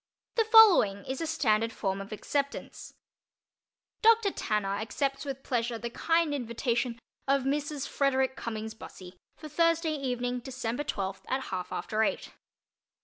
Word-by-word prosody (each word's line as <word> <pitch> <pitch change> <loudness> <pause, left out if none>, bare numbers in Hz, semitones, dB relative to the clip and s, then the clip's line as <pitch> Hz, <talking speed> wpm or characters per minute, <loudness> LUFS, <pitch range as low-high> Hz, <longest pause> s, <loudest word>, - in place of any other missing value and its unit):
The 455 - +2
following 390 - +7
is 265 +3 -4
a 325 - -1
standard 230 -8 +1
form 195 -3 -2
of 195 - -9
acceptance: 280 +6 -4 1.1
Dr. 450 -2 +5
Tanner 205 - -1
accepts 275 +6 -2
with 270 -1 -5
pleasure 240 -1 -1
the 235 +1 -5
kind 330 +2 +1
invitation 235 -1 -1 0.3
of 275 -1 +3
Mrs. 290 +1 -2
Frederick 265 -1 +1
Cummings 220 -1 -5
Bussey 185 -4 -12 0.2
for 310 - -9
Thursday 330 +1 +2
evening, 250 -3 -2
December 250 +1 -4
twelfth, 195 -7 -4
at 265 +1 -2
half 180 -1 -4
after 215 0 -2
eight. 220 - -1
260 Hz, 140 wpm, -29 LUFS, 220-290 Hz, 1.1 s, following